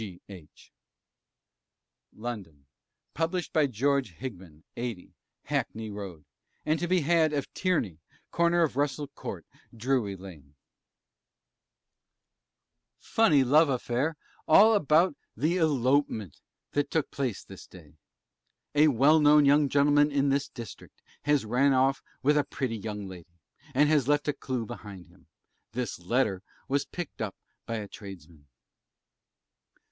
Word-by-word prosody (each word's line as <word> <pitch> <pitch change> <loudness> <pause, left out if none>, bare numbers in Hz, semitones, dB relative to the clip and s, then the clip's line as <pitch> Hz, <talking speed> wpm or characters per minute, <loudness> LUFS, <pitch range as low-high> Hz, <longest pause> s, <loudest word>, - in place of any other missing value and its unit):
G. 95 -5 -8
H. 90 -6 -14 1.4
LONDON: 100 -11 -7 0.5
Published 165 +2 -2
by 155 -2 +3
GEORGE 135 -2 0
HIGHAM, 90 -11 -9
80, 115 -6 -5 0.3
Hackney 110 -1 -3
Road; 95 -7 -8 0.4
and 155 +1 +1
to 175 - -2
be 180 0 +2
had 160 0 +3
of 140 -2 -3
TIERNEY, 125 - -1 0.3
Corner 170 0 +3
of 140 -5 -1
Russell 145 0 -1
Court, - - -8 0.3
Drury 115 -4 0
Lane, 80 -7 -13 2.4
FUNNY 180 -12 +3
LOVE 150 +4 +5
AFFAIR, 130 +4 -1 0.3
ALL 210 +8 +7
ABOUT 165 -3 +3 0.2
THE 160 +9 +1
ELOPEMENT 135 - +1 0.3
THAT 145 -1 0
TOOK 160 -3 -1
PLACE 130 -7 -3
THIS 95 - -12
DAY. 80 -6 -15 0.8
A 150 +1 +5
well 145 +4 +5
known 150 0 +6
young 145 0 +4
gentleman 145 +1 +4
in 140 0 +2
this 140 +1 0
district 115 -6 -11 0.3
has 145 -5 +2
ran 130 +5 +3
off 135 +1 +2 0.2
with 150 +2 +4
a - - +2
pretty 125 -5 -3
young 105 -1 -5
lady, 90 -2 -12 0.4
and 145 +3 +5
has 145 -4 +2
left 145 0 +2
a 150 - +1
clue 125 -5 -4
behind 100 -4 -9
him. - - -24 0.5
This 120 -5 -3
Letter 100 0 0 0.3
was 140 +1 0
picked 175 -8 -7
up 105 -4 -3 0.3
by 115 - -2
a 105 -2 -4
Tradesman. 85 -8 -12
135 Hz, 130 wpm, -28 LUFS, 105-150 Hz, 2.4 s, ALL